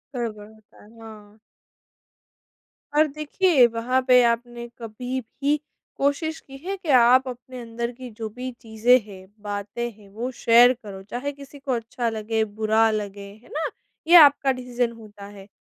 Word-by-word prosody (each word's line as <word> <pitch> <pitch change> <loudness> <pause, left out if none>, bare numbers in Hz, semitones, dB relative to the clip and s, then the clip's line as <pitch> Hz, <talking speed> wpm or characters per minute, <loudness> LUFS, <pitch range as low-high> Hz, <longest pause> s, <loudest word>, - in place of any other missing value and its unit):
गड़बड़ 215 -4 -4
होता 215 -1 -20
है, 205 - -18
हाँ। 215 -1 -13 1.6
और 310 +1 +5
देखिए 305 0 +3
वहाँ 235 +3 0
पे 250 -1 +7
आपने 240 0 -1
कभी 245 +3 -5
भी 285 +5 -2 0.4
कोशिश 315 +3 -1
की 270 0 -13
है 390 +1 -2
कि 360 -4 -9
आप 250 +2 +5
अपने 250 0 -8
अंदर 235 +1 -4
की 250 +1 -10
जो 220 -2 -4
भी 250 +4 -6
चीज़ें 230 +3 +3
हैं, 190 -2 -13
बातें 205 +3 -4
हैं 210 -2 -19
वो 225 +5 -5
शेयर 240 0 +5
करो, 195 -2 -9
चाहे 245 +8 -4
किसी 280 0 -13
को 275 -1 -4
अच्छा 235 0 -2
लगे, 220 0 -1
बुरा 220 +1 +2
लगे 205 -2 -4 0.2
है - - -19
ना? 315 +1 -2 0.4
ये 345 - +7
आपका 285 -4 +7
डिसीजन 250 -2 -2
होता 210 -2 -12
है, 200 -1 -12
235 Hz, 160 wpm, -24 LUFS, 215-260 Hz, 1.6 s, पे